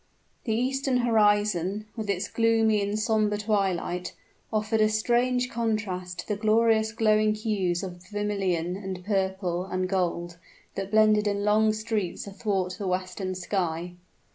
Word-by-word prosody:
The 220 -3 0
eastern 265 +2 0
horizon, 210 -4 +2
with 220 -3 -5
its 200 +1 -1
gloomy 225 -2 +2
and 200 +1 -1
somber 215 -1 +1
twilight, 195 -4 -1 0.4
offered 215 0 +1
a 215 - +4
strange 245 +3 +1
contrast 205 -6 -2
to - - -6
the 210 - 0
glorious 220 0 +3
glowing 215 -1 +2
hues 200 -5 -1
of 180 -2 -7
vermilion, 195 -4 -1
and 190 -2 -6
purple, 190 -3 -1
and 185 -1 -2
gold, 175 -2 -2 0.3
that 195 0 -4
blended 215 0 +4
in 205 0 0
long 215 +1 +4
streaks 215 -4 -3
athwart 195 -2 -2
the 200 - -3
western 185 +1 -2
sky. 175 -2 -2
205 Hz, 140 wpm, -27 LUFS, 185-220 Hz, 0.4 s, a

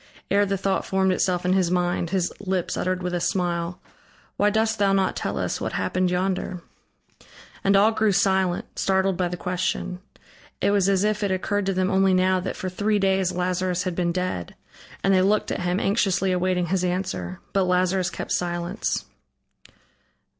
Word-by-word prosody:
Ere 200 0 +3
the 195 0 0
thought 195 0 0
formed 190 0 +1
itself 180 -1 0
in 180 - +3
his 185 -3 +2
mind, 175 -1 0
his 180 -1 0
lips 190 -3 -2
uttered 185 0 -1
with 180 0 -2
a 175 - 0
smile: 175 -1 -1 0.6
"Why 205 - +3
dost 220 +1 0
thou 200 -1 +3
not 195 -1 +1
tell - - -3
us - - -2
what - - -3
happened 185 0 0
yonder?" 180 -1 -2 1.0
And 195 +1 +4
all 205 +3 +5
grew 220 -1 +2
silent, 190 -2 +1
startled 190 0 +2
by 180 0 0
the 175 0 -5
question. 180 0 -2 0.6
It - - +2
was 200 -1 +3
as 195 -1 +2
if 210 0 0
it 200 - 0
occurred 190 +1 -1
to 195 - +1
them 185 +1 +1
only 190 -1 +3
now 185 0 +3
that 185 - -4
for 185 - -5
three 205 +3 0
days 190 -2 +2
Lazarus 180 0 -1
had 185 -1 -2
been 175 0 0
dead, 180 - -3 0.5
and 195 - +3
they 185 - +4
looked 205 +3 +1
at - - -2
him, 180 +1 0
anxiously 195 -3 +1
awaiting 180 0 +1
his 185 0 +1
answer. 180 0 -2
But 195 -1 +2
Lazarus 180 0 +1
kept - - -6
silence. 175 +3 -2
185 Hz, 180 wpm, -24 LUFS, 180-195 Hz, 1.0 s, all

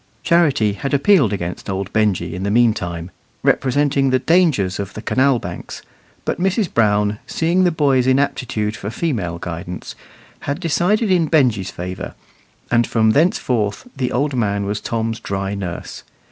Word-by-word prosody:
Charity 145 -11 +3
had 140 +6 -2
appealed 140 - +4
against 90 -1 -4
old 95 0 -3
Benjy 100 -6 +1
in 90 - -5
the 100 - -1
meantime, 95 -7 +1 0.3
representing 135 +1 +2
the 130 - +3
dangers 140 - +2
of 100 -1 -5
the 110 - -6
canal 130 0 +2
banks; 85 -5 -7 0.4
but - - -2
Mrs. 195 0 0
Brown, 105 -2 +2
seeing 175 +3 +1
the 175 - +3
boy's 140 -5 +2
inaptitude 125 -5 0
for 100 - -5
female 110 - -2
guidance, 85 +1 -6 0.5
had 140 +4 -3
decided 190 +5 +1
in 170 -3 +3
Benjy's 125 - +2
favour, 90 +1 -6 0.6
and 120 -1 +3
from 110 -1 +3
thenceforth 125 - +1
the 125 -2 -2
old 140 +2 0
man 100 -4 0
was 105 +1 -3
Tom's 115 -1 -2
dry 100 -2 -3
nurse. 90 -4 -6
115 Hz, 150 wpm, -19 LUFS, 100-145 Hz, 0.6 s, appealed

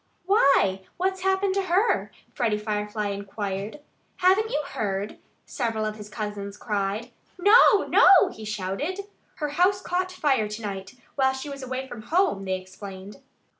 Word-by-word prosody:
"Why, 275 - +4 0.2
what's 380 +1 -1
happened 385 +1 +1
to 395 - +1
her?" 375 +6 +1 0.2
Freddie 220 -3 0
Firefly 210 0 -2
inquired. 200 +4 -5 0.4
"Haven't 385 +4 +3
you 460 - 0
heard?" 200 0 -3 0.3
several 220 -2 -2
of 215 0 -3
his 210 -1 -10
cousins 210 -2 -5
cried. 210 +2 -2 0.3
"No! 410 +2 +6
no!" 380 -3 +6
he 220 - -10
shouted. 215 - -3 0.3
"Her 300 -2 -3
house 360 +6 +2
caught 365 0 -2
fire 275 -11 +1
to 210 +2 -7
night, 195 +1 -6 0.2
while 265 -1 +2
she 265 +2 -6
was 275 -1 -7
away 260 +1 -4
from 240 -4 -8
home," 315 - +1
they 190 0 -1
explained. 190 +1 -10
220 Hz, 150 wpm, -25 LUFS, -, 0.4 s, No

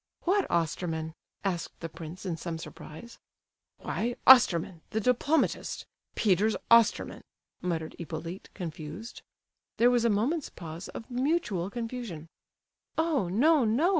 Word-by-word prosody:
"What 390 +2 +1
Osterman?" 160 -1 -1 0.3
asked 180 -4 -3
the 165 - -4
prince 165 +3 -9
in 175 -3 -1
some 165 0 -4
surprise. 165 +6 -10 0.6
"Why, 240 +1 -2
Osterman—the 190 -6 +5
diplomatist. 250 +7 +1 0.3
Peter's 210 +1 +3 0.2
Osterman," 230 -2 +4 0.4
muttered 165 -3 -2
Hippolyte, 165 +3 -6
confused. 170 +4 -7 0.6
There 240 +2 +5
was 240 -2 +3
a 235 - +4
moment's 255 +10 0
pause 165 +1 -8
of 225 - -9
mutual 245 - 0
confusion. 230 -8 -5 0.7
"Oh, 315 - +1
no, 285 - +4
no!" 240 +11 +3
200 Hz, 115 wpm, -29 LUFS, 165-245 Hz, 0.7 s, Osterman—the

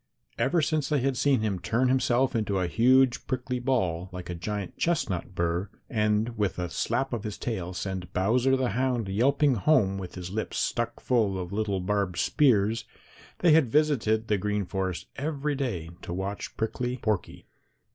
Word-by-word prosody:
Ever 165 +3 +2
since 155 -1 0
they 150 -2 +2
had 135 0 +1
seen 135 -2 +2
him 100 -4 -1
turn 115 +7 +1
himself 130 0 +2
into 105 -3 0
a 90 - +1
huge 125 +6 +3
prickly 125 0 -2
ball, 95 -9 0
like 90 -1 -6
a - - -2
giant 95 +3 -4
chestnut 95 - -1
burr, 85 +3 -1 0.2
and 105 +1 +1
with 105 -2 0
a 90 -2 -3
slap 125 +8 -1
of 115 -3 -2
his 105 -2 -5
tail 95 -7 -3
send 95 -1 -4
Bowser 120 +9 +2
the 130 -2 0
Hound 125 -3 0
yelping 135 +8 +3
home 105 -5 +2
with 90 -2 -7
his 90 -1 -6
lips 110 +2 -3
stuck 120 -1 -1
full 110 -6 +1
of 90 +1 -5
little 100 -3 -1
barbed 100 -2 -1
spears, 115 - +3 0.6
they 175 - +5
had 150 -5 +5
visited 115 -7 +2
the 105 -2 +1
Green 105 0 -1
Forest 95 -1 -3
every 150 0 -2
day 115 - -3
to 85 - -6
watch 95 +2 -5
Prickly 125 +3 -2
Porky. 110 -6 -2
110 Hz, 175 wpm, -27 LUFS, 95-130 Hz, 0.6 s, they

